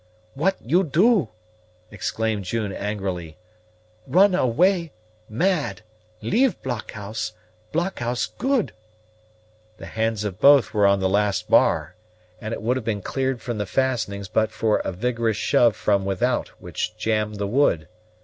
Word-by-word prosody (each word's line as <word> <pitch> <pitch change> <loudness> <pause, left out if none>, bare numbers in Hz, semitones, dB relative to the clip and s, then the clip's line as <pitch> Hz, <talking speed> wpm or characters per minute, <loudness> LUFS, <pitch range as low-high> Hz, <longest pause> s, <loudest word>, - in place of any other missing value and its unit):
"What 185 +7 +1
you 165 +11 +2
do?" 180 - +3 0.6
exclaimed 110 0 -2
June 105 +1 -2
angrily. 95 -6 -4 0.7
"Run 185 +8 +5
away 170 +3 +2 0.4
mad 145 - 0 0.4
leave 240 -1 +2
blockhouse; 110 -3 -5 0.4
blockhouse 155 -8 -1
good." 265 -4 -1 1.0
The - - -9
hands 110 -1 -1
of 95 -3 -4
both 140 -5 +6
were 105 -1 +4
on 100 0 +3
the 95 - +2
last 100 0 0
bar, - - +3 0.5
and 110 - -6
it 115 - -5
would 125 +3 +1
have 130 - -4
been 105 -3 -2
cleared 130 -3 -2
from 120 -3 -4
the 105 - -2
fastenings 110 -7 -1
but 110 +3 +1
for 110 0 +1
a - - -3
vigorous 115 +2 -1
shove 120 -3 +3
from 100 -2 +1
without, 100 +6 0
which - - -4
jammed 105 -1 -1
the 100 0 -2
wood. 100 - +2
115 Hz, 140 wpm, -23 LUFS, 105-140 Hz, 1.0 s, both